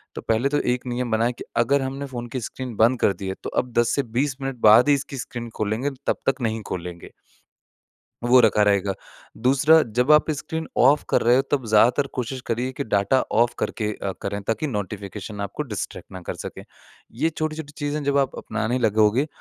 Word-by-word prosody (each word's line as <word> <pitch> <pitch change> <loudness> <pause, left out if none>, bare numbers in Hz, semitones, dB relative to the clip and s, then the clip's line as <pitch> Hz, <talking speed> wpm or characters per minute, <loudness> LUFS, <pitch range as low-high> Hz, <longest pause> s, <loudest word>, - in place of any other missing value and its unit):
तो - - -5
पहले 115 +5 +1
तो 145 - +1 0.2
एक 125 - -11
नियम 120 -1 -2
बना 110 +1 +2
है 120 - 0
कि - - -9
अगर 135 +4 +3
हमने 135 +1 -4
फ़ोन 120 -2 -6
की - - 0
स्क्रीन 125 0 -6
बंद 115 +4 +3
कर 100 - +3
दी 95 +1 -7
है 95 - -2
तो - - -3
अब 125 - -13
10 120 - +3
से 140 - +1 0.2
20 140 -1 0
मिनट 135 -1 -3
बाद 115 +6 +7
ही 145 - +6
इसकी 140 0 -5
स्क्रीन 120 0 -6
खोलेंगे 110 +6 -1 0.2
तब - - +2
तक 135 -1 +1
नहीं 110 -1 -1
खोलेंगे। 85 -1 -6 1.1
वो 125 +1 +6
रखा 105 -2 +4
रहेगा। 100 -1 +2 0.5
दूसरा 150 +5 +5
जब 125 +4 -1
आप 150 +1 +5
स्क्रीन 160 +2 -4
ऑफ़ 140 +4 +5
कर - - +2
रहे 120 +2 +5
हो 135 - +3
तब 135 -3 0
ज़्यादातर 120 +6 +4
कोशिश 125 +2 -3
करिए 125 +3 -1
कि 140 +2 -4
डाटा 100 +4 +2
ऑफ़ 120 +2 +3
करके 105 -2 -2
अ, 95 - -1
करें 100 +1 -3
ताकि 115 +9 -1
नोटिफ़िकेशन 105 -2 -5
आपको 100 +9 -3
डिस्ट्रैक्ट 105 -6 -6
ना 95 - -7
कर - - -5
सकें। - - -7 0.5
ये 155 +8 0
छोटी-छोटी 155 -1 -4
चीज़ें 145 0 -2
जब 140 0 +2
आप 135 -1 0
अपनाने 115 +3 -2
लगोगे 110 +3 +3
120 Hz, 205 wpm, -23 LUFS, 110-140 Hz, 1.1 s, बाद